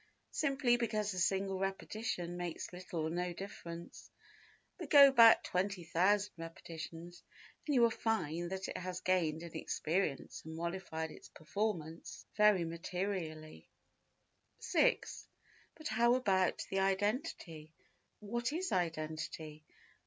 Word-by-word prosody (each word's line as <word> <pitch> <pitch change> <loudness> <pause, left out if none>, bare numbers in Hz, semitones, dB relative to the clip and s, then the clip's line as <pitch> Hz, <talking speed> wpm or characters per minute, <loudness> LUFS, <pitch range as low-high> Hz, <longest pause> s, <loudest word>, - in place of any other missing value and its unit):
Simply 270 -5 +2
because 215 -3 -1
a 185 - -3
single 190 +1 +1
repetition 195 -2 -3
makes 175 0 -5
little 180 -2 -5
or 155 - -1
no 175 +1 -2
difference; 170 -2 -8 0.7
but 335 -5 -6
go 280 -2 +9
back 230 -3 +8
20,000 190 +2 +1
repetitions 165 +1 -8 0.5
and 295 - +1
you 245 - +5
will 230 - +5
find 175 -8 -1
that 190 +1 -4
it - - -5
has 180 0 -4
gained 170 -3 +1
in 170 - -9
experience 160 -3 -2
and 160 0 -8
modified 165 -2 -4
its - - -13
performance 165 -2 -4
very 210 -4 +5
materially. 165 -2 -4 0.9
6. - - +1 0.5
But 310 -1 -6
how 235 +2 +4
about 190 -7 +1
the 195 - +1
identity? 195 - -1 0.5
What 235 +4 -2
is 365 +3 -2
identity? 155 -2 -3
185 Hz, 120 wpm, -35 LUFS, 165-215 Hz, 0.9 s, go